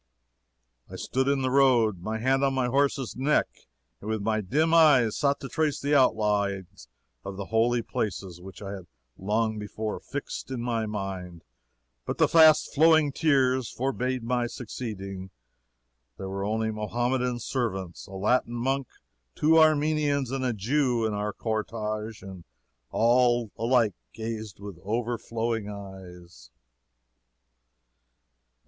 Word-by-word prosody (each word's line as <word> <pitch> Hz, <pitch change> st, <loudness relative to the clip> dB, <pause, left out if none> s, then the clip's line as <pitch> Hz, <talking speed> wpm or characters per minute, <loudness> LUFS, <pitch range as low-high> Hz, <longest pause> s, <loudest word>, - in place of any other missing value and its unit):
"I -, -, -9 dB
stood 130 Hz, +2 st, -1 dB
in 140 Hz, -1 st, +1 dB
the 130 Hz, -, 0 dB
road, 120 Hz, -8 st, +3 dB
my 110 Hz, +4 st, -3 dB
hand 135 Hz, +4 st, +1 dB
on 135 Hz, -1 st, +2 dB
my 130 Hz, -1 st, +1 dB
horse's 135 Hz, 0 st, 0 dB
neck, 140 Hz, +4 st, +2 dB, 0.5 s
and 105 Hz, -, -7 dB
with 110 Hz, -2 st, -2 dB
my 110 Hz, 0 st, 0 dB
dim 150 Hz, -, +1 dB
eyes 140 Hz, -9 st, +5 dB
sought 140 Hz, -1 st, +1 dB
to 135 Hz, -, -5 dB
trace 155 Hz, 0 st, 0 dB
the 145 Hz, +1 st, -1 dB
outlines 100 Hz, -, +1 dB, 0.4 s
of 100 Hz, -1 st, -7 dB
the 100 Hz, -, -4 dB
holy 120 Hz, +1 st, +2 dB
places 95 Hz, -5 st, -4 dB
which 95 Hz, +2 st, -11 dB
I 100 Hz, -, -5 dB
had 95 Hz, -3 st, -8 dB, 0.3 s
long 110 Hz, +2 st, -1 dB
before 105 Hz, +1 st, -4 dB
fixed 145 Hz, 0 st, -6 dB
in 130 Hz, -2 st, -4 dB
my 115 Hz, -2 st, -1 dB
mind, 95 Hz, -5 st, -5 dB, 0.6 s
but -, -, -4 dB
the -, -, +4 dB
fast 160 Hz, -2 st, +6 dB
flowing 160 Hz, -1 st, +5 dB
tears 130 Hz, -5 st, +2 dB
forbade 130 Hz, -1 st, -2 dB
my 120 Hz, 0 st, 0 dB
succeeding. 100 Hz, -6 st, -6 dB, 0.9 s
There 95 Hz, -, -6 dB
were 100 Hz, +1 st, -3 dB
our 110 Hz, -, 0 dB, 0.2 s
Mohammedan 120 Hz, +3 st, -1 dB
servants, 95 Hz, -8 st, -3 dB
a 95 Hz, -, -12 dB
Latin 120 Hz, +5 st, +1 dB
monk, 135 Hz, +2 st, -1 dB, 0.5 s
two 160 Hz, +2 st, +4 dB
Armenians 150 Hz, -3 st, +2 dB
and 135 Hz, -1 st, -2 dB
a 125 Hz, -, +1 dB
Jew 120 Hz, +2 st, 0 dB
in 110 Hz, -, -1 dB
our 105 Hz, +1 st, -2 dB
cortege, 110 Hz, -1 st, -4 dB
and 95 Hz, -3 st, -9 dB, 0.5 s
all 120 Hz, -1 st, +3 dB
alike 115 Hz, -3 st, +2 dB, 0.2 s
gazed 110 Hz, -3 st, -6 dB
with 100 Hz, -4 st, -9 dB
overflowing 115 Hz, 0 st, -2 dB
eyes." 90 Hz, -8 st, -11 dB
115 Hz, 135 wpm, -27 LUFS, 100-130 Hz, 0.9 s, fast